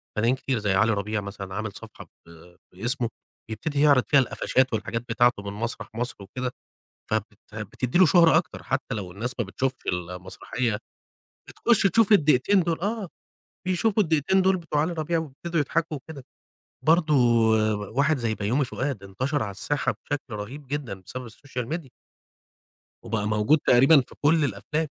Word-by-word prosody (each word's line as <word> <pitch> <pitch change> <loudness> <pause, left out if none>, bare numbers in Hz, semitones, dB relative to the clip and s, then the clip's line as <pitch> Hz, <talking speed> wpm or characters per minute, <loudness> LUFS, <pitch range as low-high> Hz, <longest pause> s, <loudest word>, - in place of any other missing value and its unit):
فنانين 115 +4 +2
كتير 130 -1 -2
زي 105 -2 0
علي 110 +4 +3
ربيع 105 +1 -2
مثلًا 100 -1 -7
عامل 110 0 -3
صفحة - - -11 0.2
ب - - -18 0.4
باسمه 120 +5 0 0.4
بيبتدي 140 +7 -2
يعرض 140 -4 +5
فيها 145 - +5
القفاشات 130 0 +1
والحاجات 115 +2 -2
بتاعته 120 -2 +2
من 100 0 -5
مسرح 115 +3 -4
مصر 120 +2 -3
وكده، 125 +6 -5 0.6
فبت 110 -1 -2 0.2
بتدّي 110 - -2
له 185 - +8
شهرة 165 0 +6
أكتر 170 - -1
حتى 125 - -2
لو 95 -5 -5
الناس 120 +6 -4
ما 120 - +1
بتشوفش 130 +6 -3
المسرحية، 90 +6 -3 0.7
بتخُش 235 -2 +2
تشوف 220 +2 +4
الدقيتين 160 +2 +4
دُول 165 -1 -1
آه، 205 +1 -2 0.6
بيشوفوا 195 +4 +2
الدقيتين 165 +3 +2
دُول 190 0 +3
بتوع 165 -4 -1
علي 160 +4 0
ربيع 165 +1 -1
ويبتدوا 160 +2 -3
يضحكوا 160 +2 -1
وكده 140 0 -10 0.6
برضه 160 -1 +4 0.8
واحد 140 +6 +2
زي 115 -3 -1
بيومي 115 +8 0
فؤاد 130 -3 -3
انتشر 130 +10 -2
على 100 - -3
الساحة 145 +9 -1
بشكل 145 -4 -4
رهيب 125 +8 -7
جدًا 130 -8 -4
بسبب 125 +5 -7
الsocial 125 +1 -6
media 165 -5 -6 1.1
وبقى 105 +1 -2
موجود 110 +8 +3
تقريبًا 135 +5 +7
في 125 - -9
كل 155 +1 +4
الأفلام، 155 +3 -2
130 Hz, 155 wpm, -25 LUFS, 110-155 Hz, 1.1 s, له